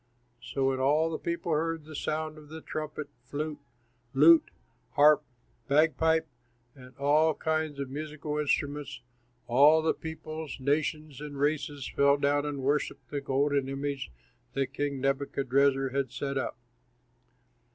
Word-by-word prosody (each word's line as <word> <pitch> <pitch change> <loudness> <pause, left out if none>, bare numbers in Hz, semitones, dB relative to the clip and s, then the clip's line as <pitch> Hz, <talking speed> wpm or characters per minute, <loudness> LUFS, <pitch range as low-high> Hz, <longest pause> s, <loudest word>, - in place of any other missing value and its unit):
'" 120 - -41
So 135 -1 +1
when 130 -1 -1
all 150 +5 +2
the 160 - -3
people 170 0 -3
heard 160 0 -1
the 155 - -10
sound 155 +1 -2
of 150 -1 -15
the 160 +1 -7
trumpet, 155 -1 -5 0.2
flute, 145 +3 -4 0.6
lute, 160 +4 +7 0.4
harp, 150 0 +6 0.4
bagpipe, 160 +2 +3 0.5
and 130 -2 -15
all 150 +3 +3
kinds 155 -2 -1
of 135 -2 -4
musical 150 +1 -4
instruments, 145 -2 -1 0.4
all 145 +6 +5
the 160 - +2
peoples, 160 -2 -7
nations, 150 +1 -1
and 145 -1 -7
races 145 -1 -1
fell 140 0 +3
down 145 +1 +1
and 140 -2 -4
worshipped 140 -2 -1
the 145 - -2
golden 140 0 +1
image 135 - -3 0.4
that 135 0 -1
King 145 -1 -2
Nebuchadrezzar 135 0 +1
had 135 -1 -2
set 140 +2 -3
up. 130 -3 -2
145 Hz, 140 wpm, -29 LUFS, 140-155 Hz, 0.6 s, lute